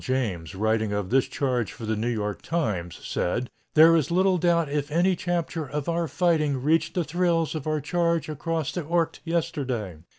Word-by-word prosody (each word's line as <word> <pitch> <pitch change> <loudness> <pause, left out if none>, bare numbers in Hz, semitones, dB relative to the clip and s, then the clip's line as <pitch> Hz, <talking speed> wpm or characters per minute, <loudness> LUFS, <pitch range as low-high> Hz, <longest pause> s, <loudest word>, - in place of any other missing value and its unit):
James, 105 -10 -2
writing 110 +1 +1
of 100 -2 -2
this 135 0 +3
charge 125 -6 -1
for 115 - -8
the 110 0 0
New 110 +3 -1
York 105 -3 -2
Times, 105 - -2
said: 120 +8 -1 0.2
"There 160 +2 +8
is 155 -5 +2
doubt 175 -2 +2
if 145 0 -2
any 180 +4 +3
chapter 175 -3 -2
of 145 0 -4
our 170 0 0
fighting 155 -5 +1
reached 160 +2 +2
the 180 - +1
thrills 165 +1 +1
of 155 -2 -5
our 155 0 +1
charge 170 +2 0
across 155 0 -2
the 175 - -3
Ourcq 165 +1 0
yesterday. 130 - -2
150 Hz, 175 wpm, -26 LUFS, 120-170 Hz, 0.2 s, There